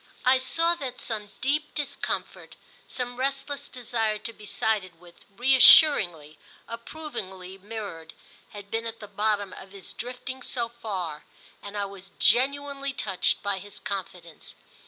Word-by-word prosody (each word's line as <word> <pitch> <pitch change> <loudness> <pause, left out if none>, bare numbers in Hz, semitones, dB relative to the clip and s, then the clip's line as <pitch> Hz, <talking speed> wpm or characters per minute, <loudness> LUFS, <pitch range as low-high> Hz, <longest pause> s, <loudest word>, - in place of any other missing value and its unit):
I 260 +1 +6
saw 330 +6 +2
that 255 -2 -4
some 215 -3 -4
deep 300 +4 0
discomfort, 290 -2 -3 0.3
some 245 -1 -3
restless 275 +1 -2
desire 225 -3 -1
to 220 +2 -4
be 210 -1 -11
sided 195 -7 -1
with, 175 -1 -18
reassuringly, 225 - +7 0.3
approvingly 195 -8 -7
mirrored, 200 -6 -7 0.3
had 205 -1 -10
been 225 +1 -1
at 230 0 -6
the 210 - -9
bottom 205 -1 0
of 190 +1 -11
his 195 -2 -9
drifting 250 +2 -6
so 235 -2 -2
far, 190 -10 -5 0.4
and 205 +1 -7
I 200 - 0
was 195 -1 -10
genuinely 280 +1 +3
touched 195 -8 0
by 200 -1 0
his 205 +1 -8
confidence. 180 -4 -6
220 Hz, 135 wpm, -27 LUFS, 195-255 Hz, 0.4 s, reassuringly